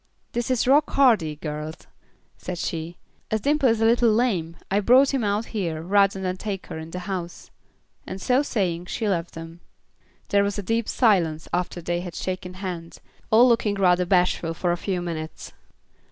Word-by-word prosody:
"This 240 Hz, +1 st, -2 dB
is 255 Hz, -2 st, +1 dB
Rock 280 Hz, +4 st, +4 dB
Hardy, 220 Hz, -, +3 dB
girls," 150 Hz, +1 st, -6 dB, 0.5 s
said 180 Hz, -1 st, -6 dB
she. 165 Hz, 0 st, -4 dB, 0.3 s
"As 220 Hz, -1 st, -1 dB
Dimple 285 Hz, 0 st, +3 dB
is 225 Hz, -1 st, +1 dB
a -, -, +4 dB
little 235 Hz, 0 st, +4 dB
lame, 195 Hz, -8 st, 0 dB
I 200 Hz, -, +3 dB
brought 255 Hz, +7 st, +5 dB
him 265 Hz, -4 st, 0 dB
out 205 Hz, +2 st, 0 dB
here, 170 Hz, -7 st, -2 dB
rather 195 Hz, +1 st, +3 dB
than 185 Hz, -1 st, -2 dB
take 195 Hz, -1 st, -5 dB
her 160 Hz, -, -7 dB
in 160 Hz, 0 st, -8 dB
the 180 Hz, -, -6 dB
house," 180 Hz, -3 st, -6 dB, 0.6 s
and 190 Hz, -, -6 dB
so 250 Hz, +7 st, +2 dB
saying, 180 Hz, -, -2 dB
she 220 Hz, -, -2 dB
left 175 Hz, -4 st, -2 dB
them. 165 Hz, +1 st, -9 dB, 0.7 s
There 200 Hz, 0 st, +3 dB
was 200 Hz, +1 st, -2 dB
a 205 Hz, -, -3 dB
deep 225 Hz, +3 st, -1 dB
silence 170 Hz, -10 st, +2 dB
after 175 Hz, 0 st, -2 dB
they 175 Hz, +1 st, -1 dB
had 175 Hz, -2 st, -7 dB
shaken 185 Hz, -1 st, -4 dB
hands; 180 Hz, -3 st, -6 dB, 0.3 s
all 235 Hz, +3 st, +6 dB
looking 225 Hz, -4 st, +2 dB
rather 180 Hz, -2 st, +3 dB
bashful 180 Hz, -3 st, +1 dB
for 175 Hz, +1 st, 0 dB
a -, -, +1 dB
few 180 Hz, 0 st, -3 dB
minutes. 160 Hz, -2 st, -6 dB
185 Hz, 180 wpm, -24 LUFS, 170-225 Hz, 0.7 s, all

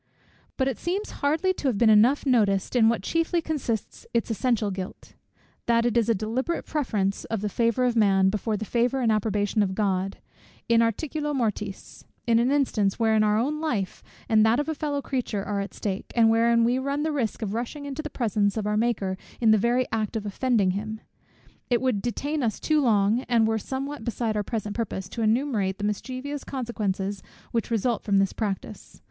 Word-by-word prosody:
But 265 Hz, -, +1 dB
it 265 Hz, -, -2 dB
seems 390 Hz, +5 st, -2 dB
hardly 320 Hz, +6 st, +2 dB
to 295 Hz, -, -3 dB
have 245 Hz, -6 st, +1 dB
been 220 Hz, 0 st, +5 dB
enough 235 Hz, +8 st, +5 dB
noticed 210 Hz, -6 st, +2 dB
in 225 Hz, -2 st, +5 dB
what 230 Hz, -4 st, -1 dB
chiefly 330 Hz, -, +1 dB
consists 285 Hz, -10 st, -3 dB
its 230 Hz, 0 st, +1 dB
essential 225 Hz, -1 st, 0 dB
guilt; 185 Hz, 0 st, -7 dB, 0.5 s
that 230 Hz, 0 st, +3 dB
it 240 Hz, -1 st, +1 dB
is 235 Hz, -1 st, +2 dB
a 230 Hz, -, +4 dB
deliberate 235 Hz, -, -2 dB
preference 210 Hz, -10 st, -1 dB
of 225 Hz, -3 st, -3 dB
the 210 Hz, -, -1 dB
favour 235 Hz, +4 st, +1 dB
of 245 Hz, -1 st, +1 dB
man, 195 Hz, -3 st, +4 dB
before 215 Hz, +1 st, -1 dB
the 220 Hz, -, -4 dB
favour 245 Hz, +4 st, +1 dB
and 230 Hz, -2 st, +3 dB
approbation 210 Hz, 0 st, +1 dB
of 190 Hz, -2 st, 0 dB
God, 195 Hz, -2 st, 0 dB, 0.5 s
in 230 Hz, 0 st, +4 dB
articulo 295 Hz, +6 st, -1 dB
mortis, 210 Hz, -5 st, -3 dB, 0.2 s
in 230 Hz, -1 st, +4 dB
an 240 Hz, +2 st, +2 dB
instance, 245 Hz, -8 st, +1 dB
wherein 220 Hz, -2 st, +3 dB
our 210 Hz, 0 st, +3 dB
own 295 Hz, +7 st, -1 dB
life, 220 Hz, -, -2 dB, 0.3 s
and 220 Hz, -1 st, +4 dB
that 225 Hz, +4 st, +3 dB
of 295 Hz, -, -1 dB
a 320 Hz, -, 0 dB
fellow 290 Hz, -2 st, -2 dB
creature 240 Hz, -7 st, -2 dB
are 205 Hz, 0 st, -2 dB
at 200 Hz, 0 st, -4 dB
stake, 195 Hz, -2 st, -4 dB
and 225 Hz, -2 st, +5 dB
wherein 230 Hz, +1 st, +4 dB
we 245 Hz, +2 st, +2 dB
run 280 Hz, +2 st, -1 dB
the 315 Hz, -, 0 dB
risk 240 Hz, -6 st, -2 dB
of 205 Hz, -1 st, -3 dB
rushing 245 Hz, +6 st, -4 dB
into 280 Hz, +1 st, -4 dB
the 305 Hz, -, -6 dB
presence 210 Hz, -5 st, 0 dB
of 215 Hz, -, -2 dB
our 210 Hz, 0 st, 0 dB
Maker 205 Hz, -5 st, 0 dB, 0.2 s
in 225 Hz, -2 st, +4 dB
the -, -, +7 dB
very 240 Hz, +4 st, +2 dB
act 220 Hz, -1 st, -2 dB
of 215 Hz, -2 st, -3 dB
offending 210 Hz, -2 st, +1 dB
him. 215 Hz, +3 st, -4 dB, 0.7 s
It 240 Hz, -2 st, +3 dB
would 255 Hz, -6 st, 0 dB
detain 285 Hz, +6 st, -2 dB
us 225 Hz, -4 st, -1 dB
too 310 Hz, -1 st, +2 dB
long, 215 Hz, -2 st, +3 dB
and 235 Hz, -2 st, +4 dB
it -, -, +3 dB
were 220 Hz, 0 st, +1 dB
somewhat 270 Hz, +2 st, -5 dB
beside 230 Hz, -2 st, -2 dB
our 210 Hz, -, +1 dB
present 210 Hz, 0 st, -4 dB
purpose, 195 Hz, -5 st, -3 dB
to 230 Hz, -, -5 dB
enumerate 220 Hz, -4 st, +1 dB
the 205 Hz, -, -6 dB
mischievous 255 Hz, +7 st, -3 dB
consequences 205 Hz, -7 st, -3 dB, 0.3 s
which 230 Hz, -2 st, -1 dB
result 230 Hz, 0 st, 0 dB
from 200 Hz, -2 st, +1 dB
this 195 Hz, -1 st, +2 dB
practice. 205 Hz, -4 st, -5 dB
230 Hz, 200 wpm, -26 LUFS, 210-260 Hz, 0.7 s, the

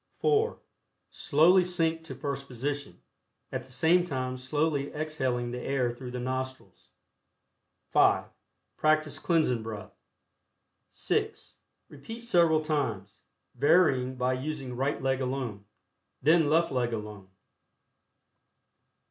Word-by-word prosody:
(4) 445 Hz, +1 st, +2 dB, 0.5 s
Slowly 175 Hz, +6 st, +4 dB
sink 165 Hz, -2 st, 0 dB
to -, -, -7 dB
first 140 Hz, -1 st, -4 dB
position, 140 Hz, +3 st, -5 dB, 0.5 s
at -, -, -4 dB
the 130 Hz, -, -15 dB
same 165 Hz, +7 st, +3 dB
time 130 Hz, -6 st, -3 dB
slowly 145 Hz, +2 st, -1 dB
exhaling 130 Hz, -6 st, -2 dB
the 125 Hz, 0 st, -5 dB
air 130 Hz, -3 st, 0 dB
through 125 Hz, +1 st, -8 dB
the 125 Hz, 0 st, -5 dB
nostrils. 130 Hz, +1 st, -5 dB, 1.0 s
(5) -, -, +4 dB, 0.5 s
Practice 155 Hz, -1 st, +2 dB
Cleansing 155 Hz, -8 st, +1 dB
Breath. 110 Hz, -2 st, -7 dB, 0.9 s
(6) -, -, -2 dB, 0.3 s
Repeat 225 Hz, +12 st, -9 dB
several 170 Hz, -9 st, +3 dB
times, 115 Hz, -9 st, -2 dB, 0.3 s
varying 130 Hz, -2 st, +3 dB
by 125 Hz, 0 st, 0 dB
using 135 Hz, -1 st, -4 dB
right 135 Hz, +4 st, -1 dB
leg 135 Hz, 0 st, 0 dB
alone, 125 Hz, -6 st, -3 dB, 0.6 s
then 160 Hz, +1 st, +4 dB
left 165 Hz, +2 st, +3 dB
leg 120 Hz, -2 st, 0 dB
alone. 105 Hz, -3 st, -7 dB
135 Hz, 110 wpm, -29 LUFS, 125-155 Hz, 1.0 s, Slowly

